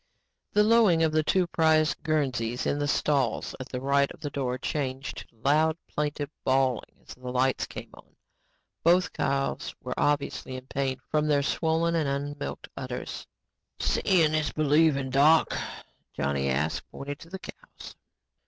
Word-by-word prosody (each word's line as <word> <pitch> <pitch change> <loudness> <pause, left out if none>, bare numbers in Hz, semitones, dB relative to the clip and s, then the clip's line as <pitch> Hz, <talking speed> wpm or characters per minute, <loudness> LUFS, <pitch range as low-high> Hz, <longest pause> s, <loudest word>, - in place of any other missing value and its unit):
The 210 - +4
lowing 210 -7 +5
of 160 - +3
the 155 0 +3
two 180 +4 +2
prize 160 -2 +3
Guernseys 130 -7 -1
in 145 - 0
the 145 - 0
stalls 140 -5 +1
at 130 - -7
the 125 - -4
right 140 +1 +2
of - - -12
the 145 - -4
door 130 -3 -2
changed 135 -1 -4
to - - -31
loud, 155 +3 +3
plaintive 145 -1 -3
bawling 130 -2 +1
as - - -8
the 125 0 -8
lights 130 +1 +1
came - - -9
on. - - -17 0.7
Both 175 +2 +4
cows 140 -2 -1
were - - -4
obviously 145 -2 0
in 130 0 -8
pain 135 -1 -2
from 155 0 +2
their 145 -2 +3
swollen 165 +3 +1
and 160 -4 +1
unmilked 145 +1 -4
udders. - - -6 0.5
"Seeing 165 -5 +2
is 155 -1 +1
believing. 150 -3 +2
Doc?" 150 +4 +5 0.6
Johnny 70 -1 -1
asked, 70 +4 -1
pointing 145 +1 -6
to 165 - -14
the 190 - -5
cows. - - -12
145 Hz, 155 wpm, -27 LUFS, 135-160 Hz, 0.7 s, lowing